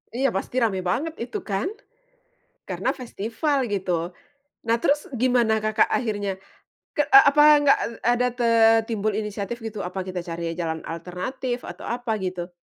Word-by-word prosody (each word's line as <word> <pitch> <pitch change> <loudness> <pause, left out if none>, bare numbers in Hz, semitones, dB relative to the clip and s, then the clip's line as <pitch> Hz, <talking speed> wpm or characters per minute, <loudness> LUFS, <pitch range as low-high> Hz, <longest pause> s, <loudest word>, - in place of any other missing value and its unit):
Iya, 270 +2 +2
pasti 195 +5 -4
ramai 200 -5 +1
banget 245 - -1
itu 240 +2 -4
kan, 195 -1 -2 1.0
karena - - -1
festival 245 +4 -2
gitu. 180 -4 -1 0.6
Nah, 230 - +4
terus 290 +3 +1
gimana 245 -3 +3
Kakak 215 0 +2
akhirnya? 205 -5 -1 0.6
Ke 295 - +3
a 405 -7 +9
apa 295 +1 +4 0.2
nggak 285 -1 +5
e - - -4 0.2
ada 245 +1 +2
te 245 -1 -1 0.4
timbul 215 -1 -1
inisiatif 210 +2 -4
gitu, 215 -3 -5
apa 185 +2 -4
kita 185 -2 -5
cari 165 -1 -4
jalan 160 -2 -3
alternatif 240 +10 -4
atau - - -9
apa 240 -1 -3
gitu? 180 -2 -4
215 Hz, 150 wpm, -24 LUFS, 185-245 Hz, 1.0 s, a